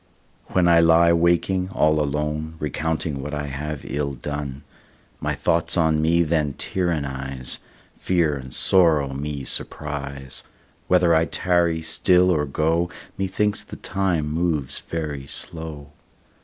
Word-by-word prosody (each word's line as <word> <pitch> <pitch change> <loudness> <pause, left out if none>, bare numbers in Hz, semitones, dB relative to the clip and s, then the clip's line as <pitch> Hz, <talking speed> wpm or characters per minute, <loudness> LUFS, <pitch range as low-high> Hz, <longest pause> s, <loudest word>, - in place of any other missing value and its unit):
When 90 -2 +2
I 85 -1 +6
lie 85 0 +5
waking 85 +2 +2
all 75 -4 +2
alone, 75 +2 -2
Recounting 75 -1 -2
what 75 +2 -4
I 75 0 -3
have 70 +1 -5
ill 70 -1 -2
done, 70 0 -5 0.6
My - - -1
thoughts 85 +2 +1
on 80 -2 +3
me 85 +2 +3
then 75 -3 0
tyrannise, 70 -7 -2 0.4
Fear 85 -5 +1
and 65 -1 -9
sorrow 75 -4 +3
me 70 0 -4
surprise, 70 -2 -3 0.5
Whether 90 -2 +4
I 80 0 +4
tarry 85 -1 +1
still 90 +3 +3
or 75 -4 +1
go, 80 +5 +1 0.3
Methinks 100 +2 0
the - - -10
time 95 -5 -1
moves 75 -3 -1
very 75 -4 -5
slow. 80 -3 -4
80 Hz, 130 wpm, -23 LUFS, 70-85 Hz, 0.6 s, I